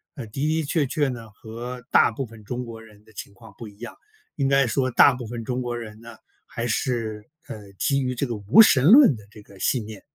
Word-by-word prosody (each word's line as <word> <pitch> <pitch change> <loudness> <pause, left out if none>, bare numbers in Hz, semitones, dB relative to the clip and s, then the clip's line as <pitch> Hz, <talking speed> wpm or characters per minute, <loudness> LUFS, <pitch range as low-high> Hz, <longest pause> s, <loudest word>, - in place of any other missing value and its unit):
呃， 135 -6 -7
的 105 - -19 0.2
的 160 +1 0
确 145 -1 0
确 145 0 0
呢 115 -3 -8
和 120 +4 -9
大 - - +5
部 135 - -5
分 115 -2 -14
中 125 +3 -4
国 115 -2 -10
人 105 -2 -18
的 110 - -21
情 100 - -10
况 110 0 -16
不 115 - -9
一 100 0 -16
样。 120 - -8 0.4
应 140 - 0
该 135 0 +3
说 130 +2 0
大 135 +3 +6
部 125 -2 -7
分 115 0 -6
中 125 +2 -3
国 120 -1 -4
人 110 -2 -9
呢， 115 0 -12 0.3
还 115 - -5
是， 115 -3 -2 0.2
呃， 105 -2 -10
基 140 +8 0
于 125 -1 -2
这 130 - -1
个 120 - -4
无 105 - +6
神 145 - +5
论 250 - +7
的 105 - -16
这 105 0 -15
个 100 -1 -18
信 120 +1 -1
念， 110 -2 -10
120 Hz, 260 characters per minute, -23 LUFS, 110-130 Hz, 0.4 s, 论